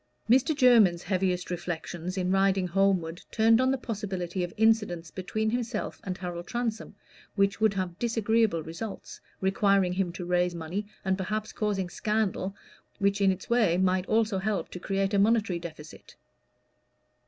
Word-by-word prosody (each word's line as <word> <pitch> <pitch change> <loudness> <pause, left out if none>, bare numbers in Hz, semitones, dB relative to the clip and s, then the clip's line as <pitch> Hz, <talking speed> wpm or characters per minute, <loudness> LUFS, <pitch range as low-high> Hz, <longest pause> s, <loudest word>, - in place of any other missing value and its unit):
Mr. 265 +6 +4
Jermyn's 220 -10 +5
heaviest 185 -2 -1
reflections 175 +1 -4
in 185 0 0
riding 195 -1 +2
homeward 180 -2 +1
turned 225 +1 +4
on 260 - +3
the 270 - +1
possibility 190 -6 -4
of 175 - -4
incidents 210 -7 +2
between 215 +4 -2
himself 240 -2 -3
and 185 -1 -4
Harold 175 -1 -6
Transome 235 -2 -3 0.4
which 200 0 +1
would 215 -2 +3
have 185 -2 -3
disagreeable 225 -6 +1
results, 195 +7 -7 0.2
requiring 195 -1 +2
him 185 -1 -1
to 175 0 -6
raise 180 0 +1
money, 170 +6 -4 0.2
and 190 0 0
perhaps 215 +3 -3
causing 205 -4 -1
scandal, 200 0 -1 0.4
which 200 0 +1
in 195 -1 +5
its 185 0 -6
way 220 -8 +3
might 185 0 +1
also 220 -3 +1
help 195 -4 -2
to 180 - -7
create 195 +2 -1
a 200 - +3
monetary 210 -4 +2
deficit. 155 -3 -11
195 Hz, 155 wpm, -28 LUFS, 180-215 Hz, 0.4 s, Jermyn's